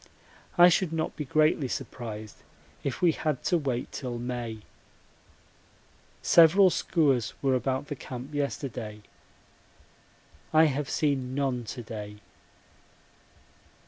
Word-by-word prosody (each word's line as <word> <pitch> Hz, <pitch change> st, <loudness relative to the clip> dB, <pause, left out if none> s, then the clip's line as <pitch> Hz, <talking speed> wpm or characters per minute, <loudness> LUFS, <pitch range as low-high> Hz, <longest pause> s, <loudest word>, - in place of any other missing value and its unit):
I 175 Hz, 0 st, +9 dB
should 180 Hz, -1 st, +1 dB
not 160 Hz, -1 st, -2 dB
be 150 Hz, -, -4 dB
greatly 155 Hz, 0 st, +2 dB
surprised 110 Hz, -4 st, -6 dB, 0.5 s
if 140 Hz, +5 st, -3 dB
we 170 Hz, -, +6 dB
had 150 Hz, -4 st, -2 dB
to 175 Hz, -, +2 dB
wait 130 Hz, -4 st, -3 dB
till 125 Hz, -3 st, -5 dB
May. 120 Hz, -2 st, -4 dB, 1.6 s
Several 175 Hz, +3 st, +6 dB
skuas 140 Hz, -, +1 dB
were 135 Hz, -1 st, +3 dB
about 130 Hz, +1 st, -1 dB
the 145 Hz, -, -5 dB
camp 130 Hz, +2 st, -8 dB
yesterday. 120 Hz, -7 st, -4 dB, 1.5 s
I 155 Hz, 0 st, +6 dB
have 145 Hz, -2 st, 0 dB
seen 135 Hz, -4 st, 0 dB
none 130 Hz, -4 st, -1 dB
to 120 Hz, +2 st, -6 dB
day. 105 Hz, -2 st, -7 dB
135 Hz, 110 wpm, -28 LUFS, 120-155 Hz, 1.6 s, I